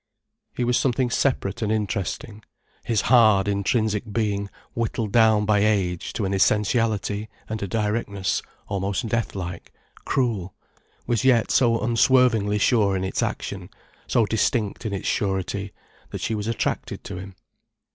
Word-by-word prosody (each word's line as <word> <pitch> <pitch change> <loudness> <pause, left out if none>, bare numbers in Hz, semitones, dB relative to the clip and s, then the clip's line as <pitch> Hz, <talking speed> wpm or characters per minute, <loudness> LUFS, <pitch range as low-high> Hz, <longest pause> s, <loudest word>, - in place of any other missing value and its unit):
He 125 - -1
was 120 0 +2
something 125 -1 +1
separate 115 -5 0
and 110 -1 0
interesting; 105 +1 -3 0.4
his 115 -4 +1
hard, 110 -5 +5
intrinsic 105 +2 0
being, 100 -2 -1 0.2
whittled 115 -2 -2
down 110 -2 +4
by 105 0 +3
age 100 -5 0
to 105 - -2
an 95 - -1
essentiality 105 0 +1 0.2
and 110 0 -4
a 100 - -2
directness 105 -1 -1 0.3
almost 100 +3 -2
death 115 -1 -1
like, 90 -2 -6 0.3
cruel, 110 -8 -1 0.5
was 120 -3 0
yet 125 -3 +3
so 115 -3 +3
unswervingly 115 -3 +3
sure 105 -2 +3
in 95 - -2
its 95 - -2
action, - - -4 0.4
so 115 - +3
distinct 110 0 0
in 105 - -3
its 95 - -3
surety, 95 0 -1 0.4
that - - -6
she 110 - -1
was 105 0 -3
attracted 115 - -2
to - - -6
him. 95 0 -9
105 Hz, 145 wpm, -24 LUFS, 100-115 Hz, 0.5 s, hard